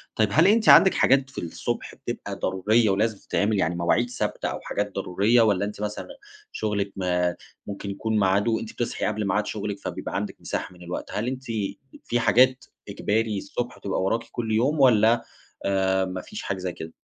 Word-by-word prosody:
طيب 110 -1 +2
هل 160 +5 +5
أنتِ 220 +1 +4
عندك 190 - +8
حاجات 135 0 +3
في 135 - -6
الصبح 85 - -4
بتبقى - - -6
ضرورية 105 +4 +2
ولازم 105 +2 +1
تتعمل، 105 +1 0
يعني 85 0 +1
مواعيد 85 +8 +1
ثابتة 125 - -3
أو - - -4
حاجات 105 0 -3
ضرورية، 100 +5 +2
والَّا 100 -3 +2
أنتِ 105 0 -7
مثلًا 105 0 -4 0.4
شغلك 100 -2 -2
ما 90 -2 0 0.3
ممكن 100 0 -6
يكون 110 +2 -1
ميعاده 100 +4 +2
أنتِ 110 - -7
بتصحي 120 - -2
قبل 105 -1 -1
ميعاد 105 +2 +1
شغلِك 100 -1 -4
فبيبقى - - -5
عندك - - -3
مساحة 90 - -4
من 90 0 -14
الوقت، 90 +1 -5
هل 110 +4 -2
أنتِ 130 -2 -4
ب 100 -3 -2 0.3
في 120 - 0
حاجات 130 +2 +4 0.2
إجباري 110 -1 -1
الصبح 120 +5 -4
تبقى 95 - -2
وراكِ 115 +5 0
كل 115 -2 -3
يوم، 130 +8 +2
والَّا 115 -2 +5 0.4
آآ، 95 -1 +2
ما 90 0 -5
فيش - - -8
حاجة 100 - -2
زي 90 -1 -4
كده؟ 80 0 -8
105 Hz, 185 wpm, -25 LUFS, 95-115 Hz, 0.4 s, عندك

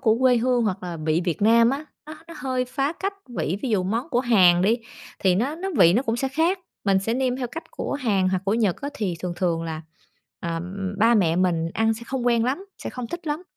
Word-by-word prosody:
của 225 -3 +3
quê 255 -1 +4
hương 245 0 +2
hoặc 195 -3 -2
là 175 -2 -5
vị 155 +2 0
Việt 175 +1 -2
Nam 230 +2 +5
á, 280 +3 -3 0.2
nó 310 - -8
nó 335 - -9
hơi 255 -2 -1
phá 275 +3 -1
cách 390 +3 -3
vị. 200 -6 -2
Ví 265 - -1
dụ 205 -4 +2
món 225 - -2
của 245 - +2
Hàn 185 -8 +5
đi 225 +5 +3 0.4
thì 185 -2 +3
nó 255 +10 0
nó 380 +3 -4
vị 170 - +7
nó 235 +7 +2
cũng 230 -3 -1
sẽ 270 +2 -1
khác, 325 +8 +1 0.3
mình 195 -1 +3
sẽ 225 +4 -1
nêm 255 0 0
theo 255 - -2
cách 325 +7 -7
của - - -4
Hàn 210 -9 +1
hoặc 185 0 -1
của 200 +2 +1
Nhật 215 -6 +1
á, 285 - -3
thì 205 -9 -2
thường 180 -1 -3
thường 170 -2 0
là, 160 -1 -5 0.6
ờ, 170 -2 -3
ừm, 190 +3 -4
ba 230 +2 +5
mẹ 170 -6 +3
mình 170 -3 +1
ăn 225 0 +2
sẽ 225 - -10
không 260 -1 -3
quen 235 -1 +3
lắm, 280 +11 -2
sẽ - - -6
không 250 -2 -5
thích 345 +7 -7
lắm. 300 +3 -2
225 Hz, 255 wpm, -24 LUFS, 185-260 Hz, 0.6 s, vị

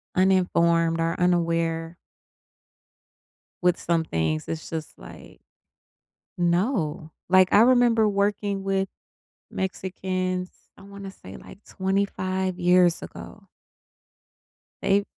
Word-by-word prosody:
uninformed 170 -3 +2
or 165 0 0
unaware 165 -1 0 1.7
with 180 -1 +3
some 165 -1 0
things, 80 - -2
it's 160 -1 -5
just 160 -2 -6
like - - -13 1.0
No. 175 - 0 0.2
Like, 185 0 +5
I 205 - +7
remember 235 -2 +4
working 200 -1 -1
with 195 0 0 0.6
Mexicans, 185 -1 -3 0.3
I - - -15
wanna 200 0 -9
say, 95 - -12
like, 205 - -14
25 190 -1 -2
years 180 -1 +4
ago. - - -11 1.4
They 200 +1 +2
185 Hz, 95 wpm, -25 LUFS, 165-195 Hz, 1.7 s, I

